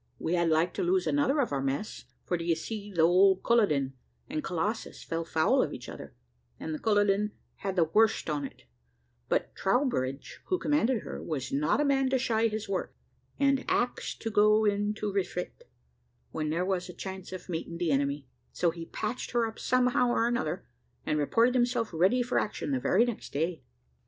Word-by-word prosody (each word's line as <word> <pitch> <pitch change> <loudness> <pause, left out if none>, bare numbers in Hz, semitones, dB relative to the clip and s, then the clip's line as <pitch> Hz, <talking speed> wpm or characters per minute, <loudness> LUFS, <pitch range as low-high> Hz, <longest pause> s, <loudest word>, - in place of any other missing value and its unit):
We 165 - -2
had 170 -1 +2
like 160 +2 +2
to - - -2
lose 365 +1 +2
another 285 0 +2
of 250 - -1
our 140 -1 0
mess, 135 +9 -3 0.2
for 180 - 0
d'ye 170 -1 0
see, 205 +5 -6
the 170 -4 +2
old 190 +3 +5
Culloden 150 - +2 0.3
and 305 +2 -3
Colossus 195 +4 -3
fell 165 0 -3
foul 160 -1 +2
of - - -1
each - - -9
other, - - -9 0.4
and 160 - -4
the 155 - -4
Culloden 205 -1 +2 0.2
had 195 -1 -3
the 175 - +4
worst 215 +8 +2
on 150 -2 -1
it, 135 - -8 0.7
but - - 0
Troubridge, 190 - -1
who 370 - +1
commanded 265 - +1
her, - - -6
was 135 -5 -4
not 150 - +1
a 295 - +2
man 270 -2 +2
to 265 - +2
shy 230 -3 +2
his 215 -1 -4
work, 195 -2 -3 0.4
and 275 -1 +3
ax 245 0 0
to 225 - -5
go 215 0 +4
in 205 0 +1
to 210 -2 -3
refit, 180 -2 -3 0.6
when 155 -1 -2
there 170 +4 0
was 185 -1 -1
a - - -7
chance 190 +1 -7
of 185 - -7
meeting 170 -1 -4
the 170 -2 0
enemy 140 0 0 0.3
so 175 -2 +1
he 165 0 -8
patched 215 +3 -4
her 240 -1 +3
up 225 0 -7
somehow 250 0 +2
or 235 -1 +2
another, 240 +1 -2 0.4
and 150 - 0
reported 230 - +3
himself 245 -2 +1
ready 190 +10 +3
for 245 - +1
action 205 -8 -3
the 130 - +1
very 195 - +3
next 240 -3 -5
day. 165 +3 -1
200 Hz, 190 wpm, -29 LUFS, 165-240 Hz, 0.7 s, old